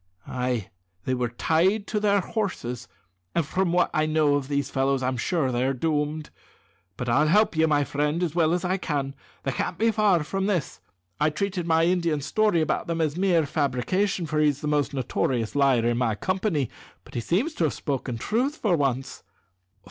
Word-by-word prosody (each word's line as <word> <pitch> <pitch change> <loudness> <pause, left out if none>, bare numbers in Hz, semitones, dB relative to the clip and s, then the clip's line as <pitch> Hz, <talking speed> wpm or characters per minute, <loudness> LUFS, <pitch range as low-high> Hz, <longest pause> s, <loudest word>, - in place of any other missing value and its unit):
"Ay. 125 -5 -2 0.3
They 130 - 0
were 125 -1 -1
tied 180 - +1
to 210 - -1
their 205 -1 +3
horses, 180 - -3 0.5
an' 170 - +3
from 175 +4 0
what 180 +1 +2
I 155 0 +2
know 155 -2 +3
of 140 -2 0
these 140 0 -1
fellows 135 0 +1
I'm 130 +1 0
sure 135 +2 0
they're 130 +2 0
doomed. 150 +1 -1 0.7
But 125 - -4
I'll 140 +6 +3
help 210 +3 +3
you, 160 0 +3
my 145 -2 +3
friend, 150 +4 -1
as 165 -4 -1
well 165 -2 +2
as 180 +1 0
I 185 +2 +1
can. 140 -6 -2 0.3
They 135 - -1
can't - - -3
be 225 +1 +3
far 205 -7 +3
from 195 +5 -2
this. 180 -9 -2 0.4
I 150 - +3
treated 180 +1 -2
my 165 0 +3
Indian's 170 -5 +1
story 210 -6 +2
about 155 - -1
them 165 0 -2
as 155 -2 0
a - - -5
mere 175 -5 +3
fabrication, 155 +7 0
for 155 -1 -1
he's 145 -2 +2
the 150 - -3
most 145 -1 +1
notorious 125 -3 -1
liar 135 -5 +3
in 120 0 +1
my 115 -4 +1
company; 185 - -1 0.3
but - - -17
he - - -2
seems 200 - 0
to 170 - 0
have 150 - 0
spoken 130 -4 -3
truth 245 - 0
for 200 -6 +2
once." 130 -3 -1
155 Hz, 195 wpm, -25 LUFS, 135-180 Hz, 0.7 s, their